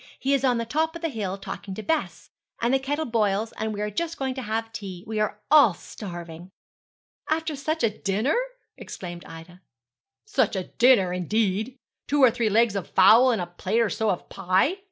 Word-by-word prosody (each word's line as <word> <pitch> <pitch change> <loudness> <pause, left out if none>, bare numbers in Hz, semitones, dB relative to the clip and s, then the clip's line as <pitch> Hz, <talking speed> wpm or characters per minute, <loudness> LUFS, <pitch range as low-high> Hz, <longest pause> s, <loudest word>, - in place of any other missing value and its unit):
He 275 +2 0
is 275 -1 +1
on 250 -3 +3
the 230 - -2
top 320 +7 -1
of 335 - -8
the 330 - 0
hill 200 -7 -4
talking 195 0 -7
to 220 - -6
Bess; 320 +4 -2 0.3
and 235 +2 +1
the 270 - +4
kettle 290 +4 -2
boils, 220 -2 0
and 220 0 -4
we 210 -1 -4
are 210 0 -2
just 335 +9 -3
going 265 -1 -2
to 260 - -5
have 225 0 -3
tea. 190 -5 -7
We 220 -1 -3
are 210 0 -1
all 285 - +7
starving.' 175 -2 -9 0.8
'After 315 -1 -1
such 310 +2 -2
a 215 -2 0
dinner!' 210 +9 0 0.4
exclaimed 175 -2 -8
Ida. 165 +2 -12 0.6
'Such 265 - +1
a 190 - -1 0.2
dinner, 235 -7 +5
indeed! 210 +5 -1 0.3
two 285 -1 +2
or 250 - +7
three 235 -2 0
legs 220 0 +3
of 195 -4 -4
fowls 225 +7 +6
and 215 - -1
a - - -4
plate 185 +5 -2
or 225 - +1
so 220 -1 0
of 185 - -2
pie!' 185 - +1
220 Hz, 200 wpm, -25 LUFS, 195-265 Hz, 0.8 s, all